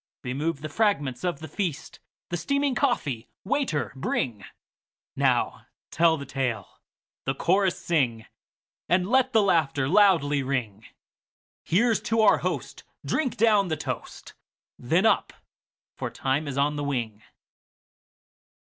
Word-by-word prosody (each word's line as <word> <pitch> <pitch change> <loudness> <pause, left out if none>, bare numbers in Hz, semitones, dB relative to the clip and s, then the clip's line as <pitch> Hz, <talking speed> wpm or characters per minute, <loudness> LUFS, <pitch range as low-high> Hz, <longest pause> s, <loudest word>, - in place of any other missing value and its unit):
Remove 140 +4 -2
the 155 - -4
fragments 145 - 0
of 175 -5 -2
the 160 - -6
feast! 165 -1 -4 0.3
The 175 - -2
steaming 280 - 0
coffee, 150 - -1
waiter, 190 - -1
bringNow 120 -5 -3 0.3
tell 165 0 +3
the 140 - -7
tale, 125 -7 -3 0.5
the 135 - -1
chorus 185 +4 +2
sing, 120 -9 0 0.6
And 180 +1 +2
let 260 +3 +3
the 220 -4 +4
laughter 155 -8 +2
loudly 165 -6 +4
ring; 120 -6 -3 0.8
Here 230 +7 +3
's - - 0
to 225 0 +1
our 215 - +5
host, - - -4 0.2
drink 265 -5 -1
down 210 -3 +4
the 160 -2 -2
toast, 155 - -6 0.5
Then - - +1
up! - - +2 0.6
for - - -4
time 135 +3 -1
is 140 -1 -4
on 145 +1 +1
the 145 - -2
wing. 120 -7 -3
155 Hz, 130 wpm, -26 LUFS, 135-200 Hz, 0.8 s, our